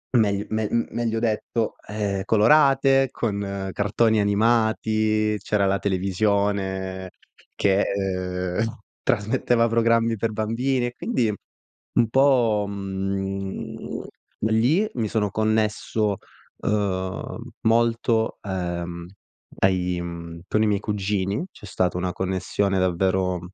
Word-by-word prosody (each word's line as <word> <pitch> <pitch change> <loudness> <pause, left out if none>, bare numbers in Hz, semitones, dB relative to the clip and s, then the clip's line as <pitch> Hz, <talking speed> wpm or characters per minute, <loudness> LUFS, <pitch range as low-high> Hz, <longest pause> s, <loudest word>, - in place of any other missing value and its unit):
meglio 105 -3 +2
me 110 0 0 0.2
meglio 115 -1 -1
detto, 110 0 -1
ehm, 100 -2 -2
colorate 135 +4 +5
con 100 -4 -3
cartoni 110 +2 +2
animati, 110 0 +2
c'era 100 -1 +1
la 100 0 +1
televisione 95 -1 0 0.5
che, 100 0 +3
ehm, 95 +1 -2 0.2
trasmetteva 115 0 +2
programmi 115 0 +2
per 110 +1 -1
bambini, 120 +4 0
e 120 - -4
quindi 120 - 0 0.6
un 115 - +3
po', 120 -5 +3
mhmm, 95 0 -4 0.4
lì 120 - +3
mi 115 -3 0
sono 105 -1 0
connesso, 110 -1 0 0.4
ehm, 100 +3 -2
molto, 115 0 +2
ehm, 85 -3 -4 0.5
ai, 90 -2 +1
mhmm, 85 -1 -7
con 110 - +2
i 110 - +3
miei 100 -1 +1
cugini, 100 0 -1
c'è - - -13
stata 90 -3 0
una 90 0 -1
connessione 95 +1 -1
davvero 95 0 +1
105 Hz, 105 wpm, -24 LUFS, 95-115 Hz, 0.6 s, colorate